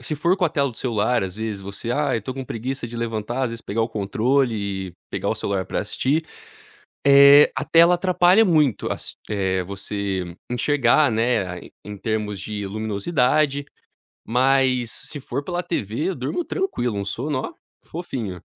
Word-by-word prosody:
se 155 - -3
for 170 +5 +1
com 190 - +1
a 165 - +3
tela 140 -2 0
do 115 - -15
celular 115 -2 0
as 95 -1 -6
vezes 110 -2 -4
você: 100 +4 -6
"Ai, 145 -3 +1
eu - - -10
tô 130 - -4
com 135 0 -6
preguiça 125 +2 -4
de 120 0 -8
levantar, 115 +1 -3
as 125 - 0
vezes 115 0 -6
pegar 115 +3 -2
o 115 - -1
controle 115 +5 +1
e 95 -3 -4 0.2
pegar - - -2
o - - +1
celular 95 -2 -2
pra - - -2
assistir." 140 +9 -1 0.8
Eh, 140 +1 +8
a - - -1
tela 170 +2 +6
atrapalha 185 +3 +4
muito 150 - +2
as - - -6
eh 95 -3 0
você 95 -2 -4
enxergar 145 +3 +3
né 115 -1 +1
a 90 -1 -6 0.2
em 105 0 -8
termos 105 -1 -2
de 105 0 -5
luminosidade, 125 - 0 0.6
mas 130 -1 +2
se 150 - -3
for 140 +1 -4
pela 175 +2 -2
tv, 165 - -2
durmo 135 - -2
tranquilo 125 - -2
um 100 - -3
sono 130 +7 -2
ó, - - -5 0.3
fofinho. 120 - -5
120 Hz, 175 wpm, -22 LUFS, 105-145 Hz, 0.8 s, Eh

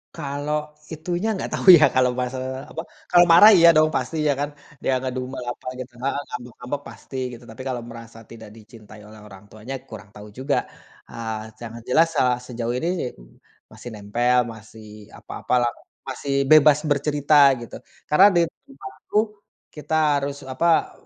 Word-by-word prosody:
Kalau 150 +2 -4 0.2
itunya 175 +5 -3
gak - - -4
tahu - - -5
ya - - +6
kalau 125 -1 +3
masalah 130 +1 -5
apa, 160 - -5 0.3
kalau 175 0 +7
marah 205 +6 +9
iya 170 -2 +7
dong 155 0 +5
pasti 130 +5 -2
ya 145 - +3
kan, 145 0 -2 0.3
dia 135 - +1
ngedumel 130 0 -5
apa - - -13
gitu 125 -1 -8
heeh, 140 +1 -1
ngambek-ngambek 125 +3 -7
pasti 135 - -13 0.2
gitu, 120 0 -12
tapi 110 - -10
kalau 125 -2 -3
merasa 115 -1 -12
tidak 110 -2 -11
dicintai 110 -1 -15
oleh 110 0 -14
orang 95 -1 -14
tuanya 110 +5 -9 0.2
kurang 105 -2 -11
tahu 105 0 -11
juga, 135 +2 -1 0.5
eee, 110 -1 -7
yang 115 -1 -8
jelas, 165 +6 +3
eee, 125 -1 +3
sejauh 120 -1 -4
ini, 160 +7 -2 0.8
masih 120 - -10
nempel, 120 +5 0 0.2
masih 110 -1 -14
apa-apa - - -6
lah, 120 - 0 0.4
masih 140 +1 -4 0.2
bebas 150 -1 +7
bercerita 145 0 0 0.3
gitu. - - -11 0.3
Karena 185 +7 +7
di 175 - +5 0.3
rumah 135 -1 -11 0.2
tuh 210 +1 +2 0.5
kita 150 +1 -4 0.2
harus 140 0 -5
apa, 160 +6 +1
130 Hz, 160 wpm, -22 LUFS, 115-150 Hz, 0.8 s, marah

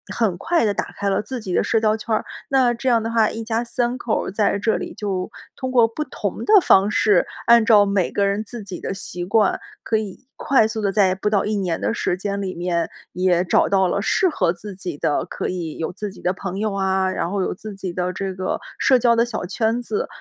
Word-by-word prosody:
很 205 -7 +1
快 335 - +1
地 205 - +1
打 - - -4
开 200 0 -1
了 195 - +1
自 245 +3 -6
己 185 -4 -5
的 - - +3
社 225 - +2
交 215 0 +2
圈 220 0 -1
儿。 - - -1 0.3
那 260 -3 +3
这 250 +3 -5
样 235 -2 +4
的 225 - -3
话， 225 -2 +3
一 225 0 -5
家 225 +1 -1
3 240 +1 -1
口 235 -2 -1
儿 - - -4
在 205 0 +1
这 220 +2 +1
里 - - -6
就 195 -4 -3 0.3
通 260 - -3
过 240 -3 +5
不 265 +7 -4
同 260 - -4
的 415 -3 +7
方 195 -6 +5
式， 205 -4 +3 0.2
按 235 -1 +6
照 210 -3 +6
每 200 -2 +1
个 200 - +1
人 200 +1 0
自 230 0 -7
己 190 -3 -7
的 - - -4
习 175 -2 -5
惯， 205 +2 +2 0.2
可 220 - +1
以 215 +3 -6
快 270 -5 +3
速 220 0 -3
地 200 -2 0
在 195 -3 +4
不 190 +2 -1
到 210 -2 +2
1 210 0 -1
年 180 -4 -2
的 - - 0
时 - - -1
间 200 +2 -3
里 190 -2 -4
面， 170 -1 -1 0.2
也 180 -1 +2
找 175 - +3
到 190 -1 +3
了 200 - -1
适 370 - +2
合 175 - +1
自 200 +3 -8
己 180 -5 -6
的， 145 - 0
可 - - -4
以 170 -4 -4
有 160 - -3
自 205 +2 -5
己 190 - -13
的 180 - +1
朋 190 0 -5
友 215 -1 0
啊， 190 -1 +1
然 170 -2 -2
后 200 +1 -1
有 - - -1
自 205 +2 -9
己 195 -2 -5
的 180 +1 -2
这 190 0 -3
个 185 0 -3 0.2
社 260 - +5
交 235 -1 +3
的 235 0 +3
小 220 -6 -4
圈 225 +5 0
子， 425 - -3
205 Hz, 265 characters per minute, -21 LUFS, 185-225 Hz, 0.3 s, 的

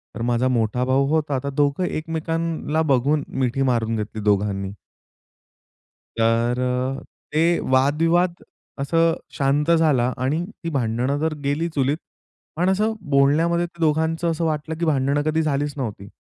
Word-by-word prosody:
तर 115 - -5
माझा 120 +1 +1
मोठा 120 -1 0
भाऊ 135 +1 +2
होता, 150 -3 +1
तर 140 - -2
दोघं 145 +4 +1
एकमेकांना 160 -1 -2
बघून 140 +3 +2
मिठी 130 0 -1
मारून 115 -4 +1
घेतली 110 0 -4
दोघांनी. 100 -1 0 1.5
तर 115 +2 +2
अ, 125 +1 -1 0.3
ते 155 - +2 0.3
वादविवाद 165 +7 +3 0.5
असे 140 +4 -1 0.4
शांत 145 +3 +2
झाला 150 -7 +3
आणि 150 +6 0 0.2
ती 165 - -2
भांडणं 130 0 -1
तर 160 0 0
गेली 145 +4 0
चुलीत. 140 -1 0 0.6
पण 180 +3 +1
असं 210 +4 +1 0.2
बोलण्यामध्ये 155 +5 +3
ते 170 0 -15
दोघांच 160 +1 +1
असं 165 0 0
वाटलं, 155 0 -2
की 170 - 0
भांडण 140 -1 +1
कधी 155 +1 +1
झालीच 145 -1 -1
नव्हती. 105 -7 -5
140 Hz, 140 wpm, -22 LUFS, 125-160 Hz, 1.5 s, वादविवाद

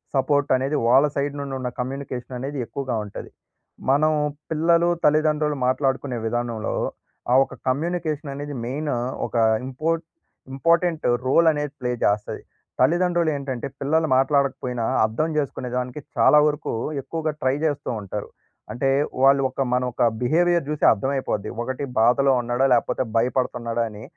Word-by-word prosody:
Support 145 +2 +1
అనేది 135 +3 -1
వాళ్ళ 135 +4 +6
side 140 0 -1
నుండి 140 -1 -5
ఉన్న 125 - -3
కమ్యూనికేషన్ 130 -1 -5
అనేది 140 +3 -5
ఎక్కువగా 130 -2 -4
ఉంటది. 100 - -8 0.6
మనం 150 +3 +4 0.4
పిల్లలు, 170 +2 +3 0.2
తల్లిదండ్రులు 150 0 +2
మాట్లాడుకునే 135 -1 0
విధానంలో 115 -1 -2 0.6
ఆ - - +5
ఒక - - -13
కమ్యూనికేషన్ 155 +1 -1
అనేది 145 +1 -6
మెయిన్ 145 +4 -3 0.4
ఒక - - -11 0.3
ఇంపోర్ట్ 160 +5 -1 0.5
ఇంపార్టెంట్ 165 +3 +1 0.2
రోల్ 165 +5 +4
అనేది 150 -2 -3
ప్లే 125 -1 -1
చేస్తది. 105 0 0 0.4
తల్లిదండ్రులు 175 +4 +2
ఏంటంటే 135 -3 -4
పిల్లలు 160 +3 +1
మాట్లాడకపోయినా 135 -3 +1 0.2
అర్థం 115 +9 -1
జేసుకునేదానికి 125 -2 -3 0.2
చాలా 150 - +6
వరకు 150 0 -2 0.3
ఎక్కువగా 160 +2 -3
ట్రై 130 0 +2
చేస్తూ 145 -3 -1
ఉంటారు. 100 +1 -5 0.4
అంటే 135 +3 0 0.3
వాళ్ళు 135 0 +6
ఒక 130 - -4
మన 125 0 +2
ఒక - - -5 0.2
బిహేవియర్ 170 +4 +2
చూసి 150 -1 -3
అర్థమయిపోద్ది. 110 -2 -1
ఒకటి 130 +3 -4 0.2
బాధలో 130 +4 +4
ఉన్నాడా 120 +2 0
లేకపోతే 125 +2 +1
భయపడుతున్నాడా 120 -1 0
అని, 105 0 -10
135 Hz, 130 wpm, -23 LUFS, 125-150 Hz, 0.6 s, వాళ్ళ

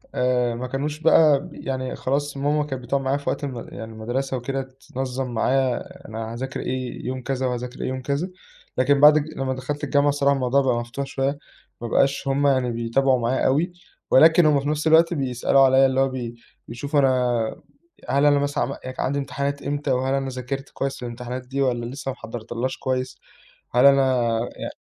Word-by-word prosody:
آآ 125 -2 +1
ما 125 +2 -4
كانوش 145 +4 -3
بقى 155 -3 +5
ب - - -10
يعني 130 -1 -4
خلاص 140 +1 -2
ماما 145 +2 +1
كان 130 -3 -5
بتقعُد 135 +3 -1
معايا 135 +1 0
في 145 - -4
وقت - - -3
الم 130 -4 -4
يعني 110 -1 -8
المدرسة 130 +4 -3
وكده، 135 +3 -3 0.3
تنظّم 130 -1 -3
معايا 130 +2 +1 0.3
أنا 110 +1 -5
هاذاكر 130 +2 -5
إيه 130 0 -4
يوم 130 0 -3
كذا، 130 0 -2
وهاذاكر 125 0 -4
إيه - - -2
يوم 130 0 -3
كذا، 140 +7 -2 0.5
لكن 140 +2 +3
بعد 150 +1 +8
الج 155 +1 -2
لمّا 130 -1 -1
دخلت 145 +3 -5
الجامعة 145 0 +2
الصراحة 140 0 +2
الموضوع 135 +1 +2
بقى 130 -3 +1
مفتوح 120 +4 -5
شوية، 135 +1 -2 0.4
ما 120 - -3
بقاش 140 +3 +1
هُم 140 +1 +2
يعني 130 -3 +2
بيتابعوا 125 +3 +1
معايا 120 +3 0
أوي، 155 +7 +2 0.4
ولكن 160 +4 +7
هُم 145 -2 +4
في 145 - -2
نفْس 155 +1 -1
الوقت 165 +2 +5
بيسألوا 135 -2 +2
عليَّ 135 0 +6
اللي 130 0 +1
هو 135 - +4
بي 120 -2 -5 0.3
بيشوفوا 140 +5 -1
أنا 125 -4 +1 0.5
هل 140 +3 +3
أنا 145 -1 +5
مثلًا 145 0 0
عم 140 - -4
يعني 130 0 -7
كان - - -2
عندي 140 +2 -1
امتحانات 140 0 -3
إمتى؟ 145 0 -2
وهل 130 +1 +1
أنا 135 -1 -1
ذاكرت 130 +2 -5
كويس 135 -2 -4
للامتحانات 125 +1 -6
دي 135 +2 -3
والّا 120 -3 0
لسّه 135 +2 -5
ما 130 - -7
حضّرتلهاش 120 +2 -5
كويس؟ 130 0 -2 0.6
هل 125 +3 +6
أنا 130 -3 +4 0.3
يع - - -5
135 Hz, 195 wpm, -23 LUFS, 125-140 Hz, 0.6 s, بعد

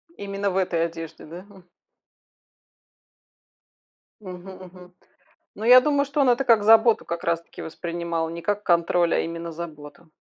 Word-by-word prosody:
Именно 200 0 -3
в 185 - -3
этой 170 -3 0
одежде, 165 -1 -9
да, 170 +3 -10
м. 190 -3 -18 2.5
Мгм 185 -1 -10
мгм. 180 0 -16 0.6
Ну, 215 - -8
я 250 +2 +8
думаю, 285 +1 +1
что 285 +1 -3
он 270 - +3
это 245 +2 +2
как 225 -4 +4
заботу 225 +1 +5
как 170 0 -5
раз 170 0 0
таки - - -12
воспринимал, 170 0 -4
не 170 +1 -8
как 205 +2 -2
контроль, 170 -1 +1
а - - +1
именно 170 0 -5
заботу. 155 -1 -10
175 Hz, 150 wpm, -23 LUFS, 170-205 Hz, 2.5 s, я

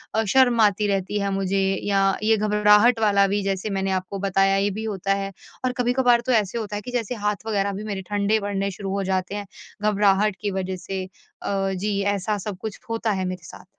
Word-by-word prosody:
अ, 220 - +2
शर्म 255 -3 +5
आती 210 0 +3
रहती 195 +1 -1
है 200 0 -1
मुझे 195 0 0 0.2
या 195 -1 +2 0.2
ये 220 0 +4
घबराहट 210 +2 +4
वाला 200 -2 +4
भी 205 +1 0
जैसे 195 +1 -2
मैंने 195 -1 -1
आपको 190 +1 -3
बताया 195 0 +2
ये 200 +1 +2
भी 215 +3 -5
होता 195 -3 -1
है। 195 0 -3 0.3
और 255 - +1
कभी-कभार 245 -1 +3
तो 255 - +1
ऐसे 205 +3 -6
होता 210 -2 -4
है 205 - -3
कि 250 - -8
जैसे 245 -1 -2
हाथ 210 +1 -1
वग़ैरह 200 -2 0
भी 200 +2 -5
मेरे 200 -3 -4
ठंडे 205 +1 +1
पड़ने 200 -1 -2
शुरू 195 +1 -5
हो 200 - -1
जाते 190 +1 -1
हैं, 205 -1 -4 0.4
घबराहट 210 -1 +3
की 205 - -1
वज़ह 190 -1 -3
से। 190 -1 -3 0.4
अ, 195 -1 -1
जी 200 +2 -1
ऐसा 205 +1 0
सब 200 -1 -5
कुछ 220 -2 -6
होता 230 -1 -1
है 190 -2 -1
मेरे 185 -1 -5
साथ। - - -12
200 Hz, 220 wpm, -23 LUFS, 195-215 Hz, 0.4 s, शर्म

